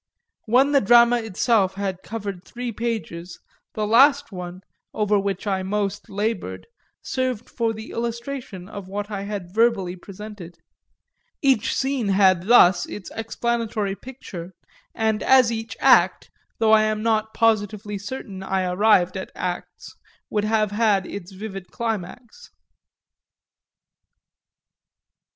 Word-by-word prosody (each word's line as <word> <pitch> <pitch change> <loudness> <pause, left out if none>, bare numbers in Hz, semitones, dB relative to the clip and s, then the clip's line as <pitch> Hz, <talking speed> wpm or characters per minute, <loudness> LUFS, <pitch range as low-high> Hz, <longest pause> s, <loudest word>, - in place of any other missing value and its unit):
When 260 +5 +4
the 280 -2 +4
drama 235 +3 +6
itself 215 -2 +1
had 190 -2 -3
covered 200 -4 -6
three 245 +2 -5
pages 205 -7 -4 0.4
the 215 - -1
last 270 +5 +5
one, 180 -1 -7 0.3
over 210 -1 +2
which 195 +1 -3
I 195 -2 0
most 200 +1 -2
laboured, 215 +3 -3 0.4
served 255 -3 -2
for 230 -2 -1
the 220 0 -8
illustration 235 -4 -5
of 200 -2 -8
what 205 +2 -5
I 200 -1 -3
had 200 -4 -6
verbally 215 -5 +2
presented. 195 -1 -10 0.9
Every 265 -6 +4
scene 265 -3 0
had 190 -2 +3
thus 190 -6 +6
its 205 - -8
explanatory 225 -2 -2
picture, 190 -8 -9 0.4
and 220 -1 0
as 255 -3 +5
each 225 0 -5
act - - +4 0.3
though 220 -1 +3
I 220 0 +7
am 215 0 -1
not 220 -1 0
positively 210 -2 +1
certain 200 -3 -7
I 190 0 -1
arrived 185 0 +3
at 190 - -5
acts 180 -1 -5 0.4
would 210 -1 0
have 215 -1 +1
had 205 -3 +2
its 195 -2 -8
vivid 195 -1 -7
climax. 230 - -5
210 Hz, 125 wpm, -23 LUFS, 195-230 Hz, 0.9 s, I